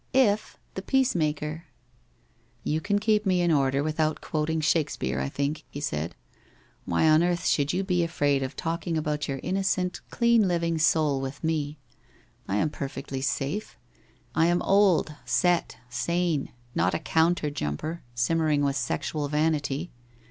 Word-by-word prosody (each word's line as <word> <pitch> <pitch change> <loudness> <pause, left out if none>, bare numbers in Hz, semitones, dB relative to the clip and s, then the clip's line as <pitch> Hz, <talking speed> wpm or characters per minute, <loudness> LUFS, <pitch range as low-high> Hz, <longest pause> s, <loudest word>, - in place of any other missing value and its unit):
' - - -38 0.2
If, 210 - -9 0.2
the 190 - -4
peacemaker!' 165 - 0 0.5
' - - -38
You 155 +1 0
can 205 +2 +1
keep 210 0 +2
me 185 -2 +2
in 175 -1 +2
order 140 -2 +2
without 155 0 0
quoting 160 +1 -1
Shake 155 -1 +2
speare, - - -2
I - - -1
think,' 140 +2 -2
he 145 - -7
said. 85 - -3 0.3
' - - -33
Why 85 - +2
on 155 +1 +6
earth 175 0 0
should 145 0 +2
you 190 +2 0
be 180 -2 +1
afraid 145 -4 +1
of 130 +1 -4
talking 165 +1 -2
about 150 -1 -1
your 135 -1 -3
innocent, 190 -1 0
clean 235 -3 +3
living 170 -2 0
soul 150 -3 +3
with 135 +3 -6
me? 155 -2 -1 0.7
I 95 - -1
am 150 +8 +1
perfectly 135 -1 -5
safe. 140 +9 -2 0.6
I 165 - +3
am 175 0 +2
old, 195 -6 +3
set, 175 -1 +1
sane, 155 +5 -1 0.2
not 90 +2 +1
a - - -1
counter 160 -1 +1
jumper, 145 - -3
simmering 150 +4 +2
with 140 0 +1
sexual 150 -2 -2
vanity. 150 +1 0
155 Hz, 160 wpm, -27 LUFS, 145-175 Hz, 0.7 s, on